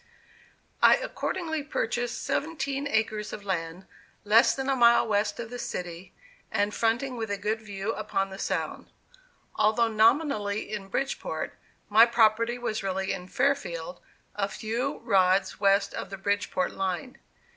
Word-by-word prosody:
I - - +8
accordingly 320 -4 -3
purchased 240 -4 -2
seventeen 280 -2 -2
acres 220 -3 -1
of 205 - -7
land, 175 -1 -3 0.4
less 215 +3 +5
than 270 0 -3
a 270 - +2
mile 235 -2 +5
west 205 0 0
of 230 0 -6
the 245 - -6
city, 175 -2 -6 0.4
and 205 -1 0
fronting 240 +3 0
with 225 -2 -3
a 200 - -1
good 215 +3 -2
view 200 0 -4
upon 195 -2 -2
the 190 - -8
Sound. - - -3 0.7
Although 220 +2 +3
nominally 220 -2 +2
in 200 -2 -4
Bridgeport, 270 +8 -3 0.3
my 220 +3 +7
property 230 0 +3
was 230 -3 -3
really 190 0 -1
in 180 - -7
Fairfield, 180 -10 -1 0.3
a 200 -1 0
few 235 +8 -3
rods 190 0 +2
west 200 0 +3
of - - -5
the 195 - -6
Bridgeport 200 -1 -1
line. 195 +7 -3
215 Hz, 145 wpm, -27 LUFS, 195-240 Hz, 0.7 s, I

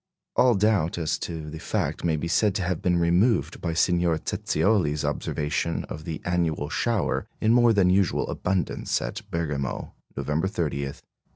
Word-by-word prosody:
All 125 -2 +5
doubt 100 -6 +2
as 80 -3 -1
to 80 -2 -5
the 80 - -7
fact - - -2
may 85 -2 +2
be 80 +2 -3
said 100 +3 +2
to 95 - 0
have 90 0 -1
been 90 -2 +2
removed 85 - +2
by 85 -2 -1
Signor 85 -1 +2
Zezioli's 80 -2 0
observation 75 +3 -1
of 75 0 -7
the 80 -2 -4
annual 85 -4 0
shower 115 +5 0
in 110 +1 +3
more 120 -1 +5
than 95 -4 +4
usual 95 0 +2
abundance 90 -5 -1
at - - -5
Bergamo, 75 -5 -3 0.2
November 80 +5 0
30, 85 -8 -2
1867. 70 -1 -6
85 Hz, 165 wpm, -26 LUFS, 80-95 Hz, 0.2 s, All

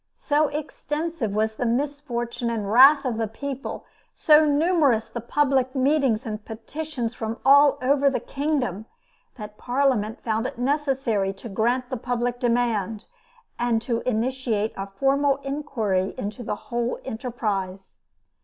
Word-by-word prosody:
So 300 0 +1
extensive 300 -3 -3
was 220 +1 0
the 245 - -1
misfortune 245 -2 -2
and 225 -2 -2
the 200 - -4
wrath 270 +6 +7
of 240 -3 -1
the 225 - 0
people, 275 +4 -6 0.3
so 305 0 +5
numerous 290 -6 +2
the 235 - -5
public 265 +1 +1
meetings 265 -3 +2
and 215 -1 -5
petitions 240 +2 -5
from 225 0 -4
all 285 +1 +6
over 280 +2 +3
the 270 - -1
kingdom, 275 - -2 0.5
that 210 -2 -10
Parliament 245 -4 0
found 220 -1 0
it - - -8
necessary 255 -7 0
to 195 +4 -10
grant 245 +5 0
the 255 - -1
public 245 0 -2
demand, 230 -4 0 0.5
and 240 -1 +1
to 235 -1 -1
initiate 230 -2 -1
a 195 0 -5
formal 275 +7 +2
inquiry 225 -10 -1
into 210 +4 -5
the 220 - -3
whole 235 +3 -3
enterprise. 210 -6 -4
245 Hz, 140 wpm, -24 LUFS, 220-280 Hz, 0.5 s, wrath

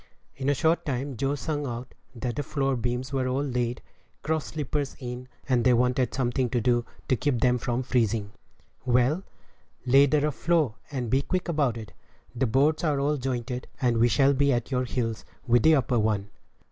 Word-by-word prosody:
In 135 0 -2
a 145 - +3
short 160 +4 +2
time 135 -1 -3
Joe 135 +5 0
sung 145 +1 -3
out 120 +1 -6 0.2
that 120 0 -3
the 145 - -1
floor 135 -2 -1
beams 125 +3 -3
were 130 -1 0
all 130 +2 0
laid, 125 -3 -2 0.4
cross 160 0 -1
sleepers 145 -2 -3
in, 125 -1 -6 0.2
and 125 -3 +2
they 125 0 +5
wanted 125 +1 +1
something 125 -1 0
to 120 - 0
do 120 +1 +1 0.2
to 130 - +3
keep 125 0 0
them 125 +1 +3
from 120 +2 -1
freezing. 115 -4 0 0.5
"Well, 125 +7 +2 0.6
lay 135 +3 +6
the 150 +1 +2
rough 150 0 0
floor, 160 -5 +1 0.2
and 125 -5 -3
be 135 - +3
quick 185 +5 -2
about 145 -8 +1
it; 110 -3 -9 0.4
the 130 +1 +1
boards 140 +8 +2
are 150 -4 +1
all 145 +2 +1
jointed, 125 -1 -3
and 120 -4 +2
we 120 - +5
shall 140 +3 +4
be 140 +1 +2
at 120 +1 -1
your 130 -1 +1
heels 115 -3 -2 0.2
with 120 -2 +4
the 160 +4 +6
upper 125 -3 +1
one." 105 -2 0
130 Hz, 195 wpm, -27 LUFS, 120-140 Hz, 0.6 s, lay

